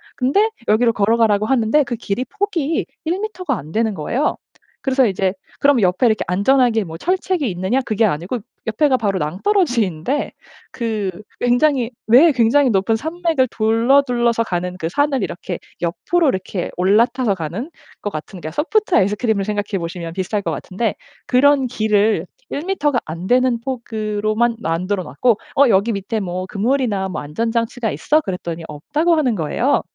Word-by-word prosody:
근데 390 - +2 0.2
여기로 230 +2 +3
걸어 210 +3 +2
가라고 215 -2 +3
하는데 265 +3 +3
그 240 -1 -4
길이 230 +1 -3
폭이 350 -7 -1 0.2
1 340 +4 -1
미터가 365 - -3
안 155 -2 -9
되는 220 -1 0
거예요. 235 - -1 0.5
그래서 265 -1 +3
이제 190 -2 0 0.3
그럼 280 -3 +4
옆에 185 +6 +3
이렇게 220 -1 +1
안전하게 225 +3 +2
뭐 165 -1 -8
철책이 365 - 0
있느냐? 190 +9 0
그게 220 0 0
아니고 180 +7 -2 0.3
옆에가 260 +4 +2
바로 200 -5 -1
낭떠러지인데 230 - 0 0.4
그 220 -6 -2 0.3
굉장히 245 0 +2 0.2
왜 270 +9 +7
굉장히 255 +3 +3
높은 195 +3 +2
산맥을 320 0 0
둘러 230 +5 +3
둘러서 240 -3 +1
가는 180 -2 -3
그 165 - -2
산을 285 - +1
이렇게 175 0 -4 0.2
옆으로 300 - +1
이렇게 190 -3 -3
올라타서 210 +4 +2
가는 185 - -5 0.3
것 205 - -2
같은 155 +4 -7
소프트 380 - +1
아이스크림을 205 +1 +1
생각해 205 -2 -2
보시면 170 0 -5
비슷할 190 +3 -2
것 - - -3
같은데 205 +3 -3 0.3
그런 270 +1 +4
길을 215 -5 +1 0.3
1 285 - -3
미터가 295 -9 +1
안 165 +3 -6
되는 250 0 +3
폭으로만 225 -2 -1
만들어 185 +1 -1
놨고 200 - +1 0.2
"어 280 -2 +6
여기 215 +2 +3
밑에 200 +3 -3
뭐 185 -2 -3
그물이나 215 -2 0
뭐 180 -5 -4
안전 155 +11 -2
장치가 230 0 -1
있어?" 305 - +2
그랬더니 175 - -5
없다고 295 - 0
하는 260 -8 +1
거예요. 190 - +1
225 Hz, 355 characters per minute, -19 LUFS, 190-270 Hz, 0.5 s, 왜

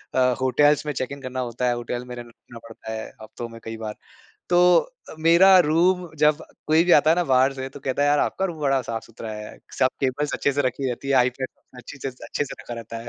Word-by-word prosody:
अ, - - +3 0.2
hotels 145 +4 +3
में 150 - -2
check 130 +1 -4
in 140 -1 -8
करना 130 0 -5
होता 125 0 -2
है, 120 - +2
होटल 120 +1 -5
में 125 - -7
रहन 120 0 -8
रुकना 115 0 -15
पड़ता 110 0 -9
है 110 - -5 0.2
हफ्तों 115 +2 -8
में 115 0 -11
कई 115 0 -6
बार। 110 -1 -6 0.6
तो 175 - +4 0.5
अ, - - -9
मेरा 175 +4 +6
रूम 180 +2 +2
जब 150 +1 +3 0.2
कोई 160 +2 +4
भी 180 - +3
आता 155 - +2
है 165 - +4
ना 175 - +1
बाहर 130 +2 +4
से 130 0 -5
तो 135 +1 -12
कहता 135 +2 -1
है 145 - +3
यार 145 0 +3
आपका 190 - 0
रूम 165 -5 -4
बड़ा 135 -2 +2
साफ-सुथरा 115 -1 -7
है। 105 0 -9 0.2
सब 130 - +4
केबल्स 140 +2 -1
अच्छे 140 - 0
से 145 +1 0
रखी 130 +1 -1
रहती 135 +3 -6
है, 140 - +2
आईपैड 130 +1 +1 0.3
अच्छे 125 +3 -11
छे 135 - -4
स 125 - -20
अच्छे 145 - -2
से - - -8
रखा 120 - -7
रहता 115 0 -8
है। 120 - -9
130 Hz, 250 wpm, -23 LUFS, 120-150 Hz, 0.6 s, मेरा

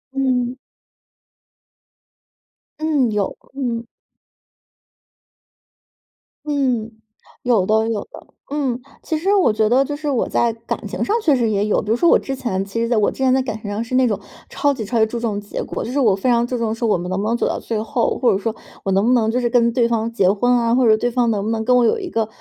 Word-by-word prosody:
嗯。 255 -2 0 2.2
嗯， 300 -6 +1
有， 205 -2 -1 0.2
嗯。 240 -4 -3 2.6
嗯， 255 -6 0 0.5
有 230 -7 +2
的 220 +2 +2
有 220 -2 -1
的， - - -12 0.2
嗯。 265 -4 -1 0.2
其 320 - -2
实 380 +6 +1
我 375 - +4
觉 215 0 +2
得 260 +3 +4
就 290 +1 -4
是 295 0 -4
我 260 -5 0
在 235 -1 +1
感 230 +1 -6
情 - - -3
上 415 - +1
确 320 -8 +3
实 235 -3 +1
也 205 -1 +1
有， 215 - +1
比 205 - -8
如 225 - +3
说 335 +8 +3
我 - - +6
之 270 - -4
前 195 -7 -2
其 205 +4 -3
实 230 - -1
在 240 - +2
我 210 - +3
之 - - -10
前 260 -1 +3
在 265 - +3
感 230 -4 -4
情 205 - -5
上 205 +2 -2
是 235 +2 -3
那 260 0 +4
种 215 -5 0 0.3
超 285 0 +1
级 250 -5 -5
超 230 +3 -1
级 220 - +5
注 220 +2 -5
重 215 -4 -1
结 205 0 -5
果， - - -5
就 - - -5
是 280 - 0
我 220 -6 +4
非 195 +6 -1
常 235 -1 +3
注 250 +1 -3
重 225 -1 -1
说 230 - -2
我 210 - +2
们 175 +1 -5
能 185 +1 -1
不 - - -2
能 230 +2 +1
走 - - 0
到 - - -2
最 220 -2 -2
后， 240 +1 -1
或 250 - +3
者 - - +1
说 215 +3 -2 0.3
我 195 - -1
能 195 +2 +2
不 250 - +4
能 225 -3 +2
就 250 - 0
是 240 -1 0
跟 235 -1 +3
对 235 -1 +2
方 230 -1 -1
结 200 -5 +2
婚 210 +5 +2
啊， 235 -1 +2
或 255 0 +3
者 215 -1 +5
对 245 - 0
方 240 -1 +1
能 205 -2 -1
不 - - -1
能 225 -1 -1
跟 250 +3 +2
我 245 - +4
有 345 - +2
一 380 -5 -5
个 225 -8 -1
235 Hz, 260 characters per minute, -20 LUFS, 220-255 Hz, 2.6 s, 我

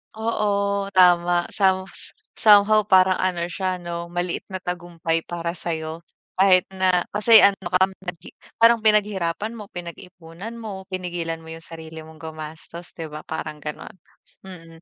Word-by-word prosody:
Oo, 200 -3 -1
tama. 175 -2 +4
Some 190 -2 +2 0.5
somehow 215 0 +6
parang 185 -1 +4
ano 175 -2 -1
siya, 185 +1 -3
'no, 170 0 -6
maliit 175 0 -3
na 190 - -4
tagumpay 170 -2 -3
para 170 0 -4
sa'yo 160 -1 -4 0.3
kahit 185 -1 +4
na 185 -2 +2
kasi 220 +2 +7
ano 200 - +6 0.2
ka, 185 +1 +4 0.2
naghi 180 -2 -8 0.3
parang 230 -1 +5
pinaghirapan 210 -1 +1
mo, 210 -3 -10
pinag-ipunan 175 +2 -9
mo, 205 -4 -7
pinigilan 175 -3 -4
mo 160 - -15
yung 165 0 -9
sarili 160 -1 -9
mong 160 0 -14
gumastos, 160 +2 -9
‘di 165 - -5
ba, 150 0 -8
parang 155 -1 -6
gano'n, 150 -1 -7 0.5
mm. 165 -3 -12
180 Hz, 140 wpm, -23 LUFS, 165-195 Hz, 0.5 s, kasi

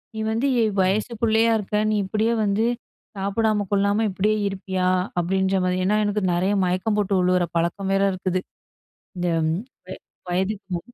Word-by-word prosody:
"நீ - - -4
வந்து 230 +5 0
எ - - +4 0.2
வயசு 195 +5 +1
பிள்ளையா 225 0 +3
இருக்க. 210 0 -2
நீ - - +1
இப்படியே 220 +4 0
வந்து 205 +2 +1 0.5
சாப்பிடாம, 205 +1 0
கொள்ளாம 200 +2 +2
இப்படியே 210 +3 +1
இருப்பியா? 190 -1 -2 0.3
அப்படீன்ற 190 +2 +1
மாதிரி. 180 0 0
ஏன்னா, 205 +3 +2
எனக்கு 205 0 0
நெறைய 185 +4 +1
மயக்கம் 185 +4 0
போட்டு 205 -1 0
வுழுவுற 180 0 +2
பழக்கம் 180 +4 -1
வேற 195 0 +2
இருக்குது. 185 0 -2 0.8
இந்த 180 0 -1 0.2
ம் 160 - 0 0.3
வ - - -14 0.4
வயதுக்கு 190 +3 -1
மு - - -2
195 Hz, 160 wpm, -23 LUFS, 185-210 Hz, 0.8 s, எ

